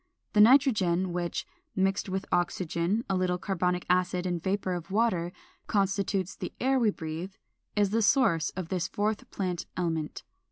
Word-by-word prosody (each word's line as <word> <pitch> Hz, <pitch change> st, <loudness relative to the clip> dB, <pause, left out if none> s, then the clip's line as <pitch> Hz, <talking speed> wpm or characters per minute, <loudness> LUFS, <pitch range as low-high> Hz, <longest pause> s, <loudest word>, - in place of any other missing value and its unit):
The 210 Hz, -, +6 dB
nitrogen 205 Hz, -, +4 dB
which, 175 Hz, -1 st, -2 dB, 0.3 s
mixed 195 Hz, +1 st, +1 dB
with 190 Hz, +1 st, -2 dB
oxygen, 175 Hz, +4 st, 0 dB
a 195 Hz, -, 0 dB
little 185 Hz, -1 st, +1 dB
carbonic 180 Hz, -1 st, -1 dB
acid, 180 Hz, 0 st, +1 dB
and 175 Hz, -2 st, -1 dB
vapor 190 Hz, 0 st, -1 dB
of 175 Hz, 0 st, -5 dB
water, 190 Hz, -5 st, +1 dB, 0.4 s
constitutes 195 Hz, -2 st, 0 dB
the -, -, -6 dB
air 265 Hz, +1 st, +2 dB
we 230 Hz, -3 st, +4 dB
breathe, 165 Hz, +1 st, -5 dB, 0.4 s
is 205 Hz, -2 st, +2 dB
the 225 Hz, +1 st, +2 dB
source 195 Hz, -, +3 dB
of 180 Hz, -3 st, -4 dB
this 180 Hz, -3 st, -1 dB
fourth 210 Hz, +1 st, -2 dB
plant 180 Hz, -3 st, -3 dB
element. 160 Hz, -4 st, -2 dB
185 Hz, 155 wpm, -29 LUFS, 175-205 Hz, 0.4 s, The